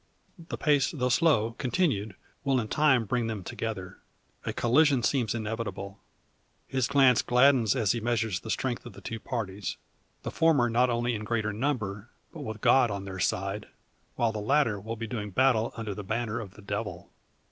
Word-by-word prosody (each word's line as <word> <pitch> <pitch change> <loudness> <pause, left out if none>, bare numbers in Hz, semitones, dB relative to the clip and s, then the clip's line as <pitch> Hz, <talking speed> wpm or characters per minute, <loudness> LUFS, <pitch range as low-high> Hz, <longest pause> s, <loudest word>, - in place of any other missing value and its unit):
The - - -3
pace 145 -3 +3
though 125 -5 -1
slow, 120 -5 +3
continued, 120 - 0 0.3
will 135 -2 +2
in 110 -2 -3
time 135 -6 +3
bring 120 +2 0
them 110 -4 -4
together. 100 -2 -5 0.5
A - - -1
collision 135 +1 +3
seems 120 -2 +1
inevitable. 105 -3 -4 0.7
His 130 -2 0
glance 135 -4 +5
gladdens 125 -3 +4
as 110 -7 +2
he 120 - -1
measures 110 -4 0
the 110 - -9
strength 120 +1 -2
of 120 - -10
the 100 - -12
two 115 +3 -5
parties. 105 -6 -4 0.5
The - - -4
former 145 -8 +3
not 125 +2 +3
only 120 0 0
in 110 -1 -4
greater 110 -1 -1
number, 110 -4 -2 0.2
but 160 - -8
with 110 -5 -6
God 130 -3 +5
on 100 -1 -4
their 95 -1 -6
side; 100 +3 -1 0.5
while 115 -1 +1
the 110 - -4
latter 115 -2 +2
will 110 +3 -5
be 115 0 -5
doing 105 -2 -4
battle 120 +1 +2
under 110 -3 -4
the 105 - -7
banner 115 +2 -2
of 100 -4 -8
the 105 - -14
Devil. 100 -3 -5
115 Hz, 180 wpm, -28 LUFS, 105-125 Hz, 0.7 s, glance